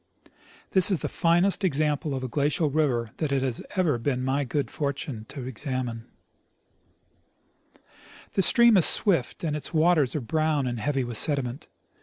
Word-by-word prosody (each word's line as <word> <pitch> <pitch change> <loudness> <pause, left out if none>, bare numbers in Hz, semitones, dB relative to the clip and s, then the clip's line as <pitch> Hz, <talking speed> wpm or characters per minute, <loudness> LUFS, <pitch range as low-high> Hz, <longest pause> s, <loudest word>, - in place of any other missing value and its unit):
This 190 -1 +6
is 190 -5 0
the - - -2
finest 175 +4 +1
example 150 -3 0
of 130 - -5
a - - -3
glacial 145 +3 0
river 130 -7 0
that 155 -3 -3
it 135 -1 0
has 130 -3 -2
ever 165 -10 +1
been 130 +1 -2
my 135 +2 0
good 140 +2 -3
fortune 140 -6 -4
to 140 -3 -8
examine. 130 -3 -5 2.3
The - - +1
stream 235 +2 +5
is 175 - +5
swift, 175 - +2
and 155 -3 -2
its 150 +2 -6
waters 155 -4 +2
are 150 - -2
brown 155 +2 -1
and 120 -2 -3
heavy 135 +2 -1
with 120 -3 -2
sediment. 140 -2 0
145 Hz, 160 wpm, -25 LUFS, 130-160 Hz, 2.3 s, This